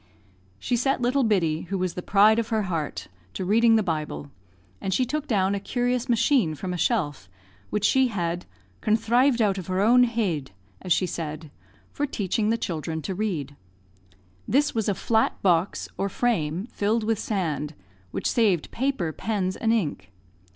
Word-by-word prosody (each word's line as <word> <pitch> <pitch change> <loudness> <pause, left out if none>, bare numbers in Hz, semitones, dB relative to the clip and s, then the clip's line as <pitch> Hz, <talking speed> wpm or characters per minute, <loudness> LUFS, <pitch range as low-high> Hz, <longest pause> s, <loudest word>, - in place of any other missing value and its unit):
She 245 - -1
set 270 +4 +1
little 250 +3 +2
Biddy, 175 -7 +1
who 195 - -1
was 185 -2 -1
the 180 - -5
pride 210 +4 +5
of 230 - -1
her 220 -2 0
heart, 155 - -3 0.3
to 185 - -3
reading 225 +4 +4
the 220 - +3
Bible; 155 -4 -3 0.5
and 190 - -2
she 255 +7 +2
took 300 +4 -3
down 200 -5 +2
a 200 - -1
curious 245 +3 -1
machine 230 - +3
from 180 +4 -4
a - - -2
shelf, 150 - -1 0.4
which 210 -1 0
she 265 +2 +4
had 175 -5 -3 0.3
"conthrived 235 +3 +3
out 195 -2 +1
of 180 - -8
her 185 0 -1
own 245 +5 +6
head," 200 - -1 0.3
as 180 - -6
she 185 - +4
said, 155 -3 -5 0.4
for 290 - -2
teaching 210 -3 -1
the 230 - +2
children 160 -5 -4
to 195 - -3
read. 175 -9 -3 0.9
This 290 +3 +2
was 220 -2 0
a 200 - +1
flat 220 +3 +1
box, 180 -1 +1
or 200 - 0
frame, 190 -6 0
filled 215 +2 0
with 220 -1 0
sand, 160 -9 -2 0.3
which - - -5
saved 200 -9 +2
paper, 245 - -1
pens, 190 -2 -2
and 225 - 0
ink. 180 - -1
200 Hz, 170 wpm, -25 LUFS, 170-230 Hz, 0.9 s, own